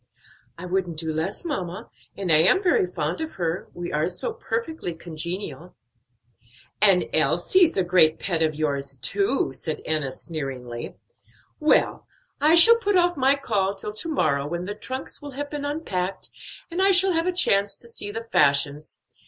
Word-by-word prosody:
"I 175 - -8
wouldn't 180 -2 -2
do 160 0 -3
less, 160 - -4
mamma, 190 - -5 0.3
and 190 -4 -1
I 155 - +6
am 375 - +4
very 345 - +2
fond 165 - -3
of 320 0 -5
her; 170 -1 -3
we 175 0 -6
are 155 +3 0
so 180 - -4
perfectly 230 - -4
congenial." 170 +2 -7 1.1
"And 195 -4 +6
Elsie's 175 - +3
a 190 - +3
great 175 -3 +3
pet 170 -4 -2
of 155 -1 +1
yours, 140 -3 -3
too," 195 - 0
said 155 +4 -5
Enna 155 -4 0
sneeringly. 130 -6 -7 0.6
"Well, 305 -1 +1 0.3
I 310 +3 +5
shall 460 +8 +10
put 410 -4 +1
off 350 0 +2
my 270 0 +3
call 200 -8 -1
till 210 +2 -6
to 330 +10 -3
morrow, 150 - 0
when 175 +3 -4
the 205 - -4
trunks 260 +5 -6
will 290 -1 -9
have 290 0 -5
been 290 -1 -4
unpacked, 195 - -3 0.4
and 350 +3 -2
I 390 - +4
shall 380 0 +5
have 330 +1 0
a - - +2
chance 200 - +2
to 235 - -12
see 215 -3 -5
the 225 +2 -5
fashions. 145 -7 0
185 Hz, 170 wpm, -24 LUFS, -, 1.1 s, shall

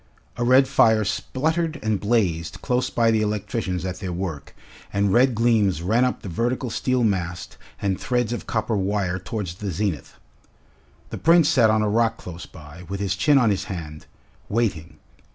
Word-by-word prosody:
A 120 - -2
red 130 +2 +5
fire 110 -5 +4
spluttered 160 +9 -1
and 110 -2 0
blazed 90 -7 -1
close 125 -1 0
by 115 -1 +2
the 110 -1 +2
electricians 105 -3 -2
at 90 -1 -4
their 95 -3 -4
work, 85 -5 -5 0.4
and 100 -1 +1
red 125 0 +4
gleams 105 -7 +2
ran 115 +7 +2
up 125 - -3
the - - -6
vertical 120 +6 -2
steel 130 +1 0
mast 90 -5 -2 0.2
and 95 -2 -1
threads 120 -2 0
of 120 - -6
copper 110 0 -1
wire 95 -2 -1
towards 95 -2 -5
the 100 +2 -5
zenith. 95 -4 -3 1.0
The - - -5
Prince 165 -1 +5
sat 125 -8 +4
on 110 0 +2
a - - +1
rock 115 +2 +1
close 90 -1 -9
by, 75 +2 -13
with 100 0 -4
his 95 -2 -1
chin 145 +8 +3
on 120 -5 +4
his 100 - -2
hand, 80 -5 -7 0.4
waiting. 100 -8 -2
105 Hz, 175 wpm, -23 LUFS, 95-120 Hz, 1.0 s, red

